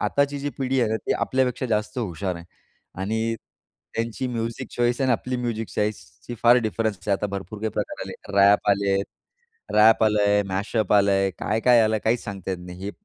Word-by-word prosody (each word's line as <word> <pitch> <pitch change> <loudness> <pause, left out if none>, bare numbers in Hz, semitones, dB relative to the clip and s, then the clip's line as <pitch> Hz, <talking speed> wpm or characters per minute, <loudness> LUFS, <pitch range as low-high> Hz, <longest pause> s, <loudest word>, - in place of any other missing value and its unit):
आताची 140 0 +1
जी 145 +1 -3
पिढी 135 -1 +1
आहे 115 -3 +1
ना 110 - +1
ती - - +2
आपल्यापेक्षा 130 -1 0
जास्त 105 0 -1
हुशार 95 -3 -3
आहे 85 - -10 0.6
आणि 110 +3 -1 0.6
त्यांची 115 +3 -2
म्युझिक 115 -1 -4
चॉईस 120 +1 +1
आणि 130 - +2
आपली 125 +2 -2
म्युझिक 115 -3 -3
चॉईसची 105 +3 -4
फार 120 +1 +7
डिफरन्स 105 +1 -2
आहे. 100 - +3
आता 105 - -2
भरपूर 100 +2 -6
काही 110 0 -1
प्रकार - - -4
आले. - - -7 0.2
रॅप 100 +1 +5
आले 100 0 +1
आहेत. 100 +1 +1 0.7
रॅप 110 +1 +6
आलंय, 105 -1 +3
मॅशअप 100 +2 -1
आलंय, 100 -1 +3
काय, 110 +2 -1
काय 120 -1 +5
आलंय 110 0 +2
काहीच 115 +2 +1
सांगता 95 -2 -6
येत 95 - -2
नाही. 90 0 -10
हे 100 - -3
110 Hz, 190 wpm, -24 LUFS, 100-120 Hz, 0.7 s, फार